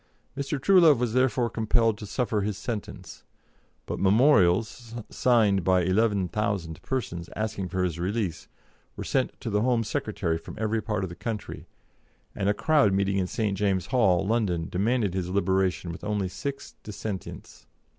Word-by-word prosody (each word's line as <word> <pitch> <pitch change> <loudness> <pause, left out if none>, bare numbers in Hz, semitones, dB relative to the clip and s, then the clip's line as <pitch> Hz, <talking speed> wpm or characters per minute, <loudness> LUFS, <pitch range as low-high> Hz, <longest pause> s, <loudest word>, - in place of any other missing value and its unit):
Mr. 140 +1 -3
Truelove 170 -2 +6
was 120 -2 -1
therefore 130 -1 +2
compelled 115 0 +1
to 105 - -7
suffer 110 -1 -1
his 100 0 -2
sentence, 100 -5 -6 0.6
but - - -4
memorials, 110 +1 +3 0.2
signed 110 -7 +3
by 95 0 +3
11,000 100 -3 0
persons, 90 -10 -4
asking 105 -4 -3
for 95 +1 -1
his 85 -2 -2
release, 95 -2 -2 0.5
were - - -5
sent - - -1
to - - -4
the 105 0 +1
Home 120 -1 +2
Secretary 80 -5 -2
from - - -10
every 110 +1 0
part 105 -2 -2
of 95 - -3
the 85 - -9
country, 110 0 -6 0.7
and 100 -1 -1
a - - +3
crowded 145 -8 +3
meeting 100 0 +1
in 90 - 0
St. 105 0 -1
James's 95 -2 0
Hall, 95 -8 +3
London, 95 -7 0
demanded 105 +1 +1
his 90 -1 -2
liberation 95 -2 0
with 85 - -9
only 105 -2 -1
six 140 +9 -6
dissentients. 105 -2 -7
105 Hz, 155 wpm, -26 LUFS, 95-115 Hz, 0.7 s, Truelove